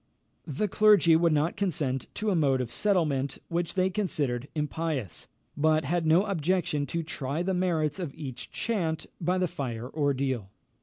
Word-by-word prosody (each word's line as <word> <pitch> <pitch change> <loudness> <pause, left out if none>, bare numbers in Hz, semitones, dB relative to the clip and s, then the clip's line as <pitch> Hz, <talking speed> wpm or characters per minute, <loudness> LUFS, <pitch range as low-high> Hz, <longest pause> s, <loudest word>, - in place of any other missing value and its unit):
The 155 +9 -1
clergy 205 -5 +5
would 165 0 +3
not 155 +2 +1
consent 145 -9 -1
to 210 0 0
a - - +2
mode 140 -5 +3
of 125 -2 -3
settlement 150 -7 +1
which 170 0 -1
they 185 0 +2
considered 145 - -1
impious, 150 - -3 0.3
but 155 0 +2
had 165 +2 0
no 165 +5 +5
objection 175 -5 0
to 170 +5 -2
try 150 +1 -3
the 190 +1 0
merits 175 -3 0
of 170 -6 -3
each 135 -6 -7
chant 170 -9 -2 0.2
by 180 +3 +1
the 185 0 +1
fire 120 -6 -4
ordeal. 135 -8 -1
160 Hz, 160 wpm, -28 LUFS, 140-180 Hz, 0.3 s, clergy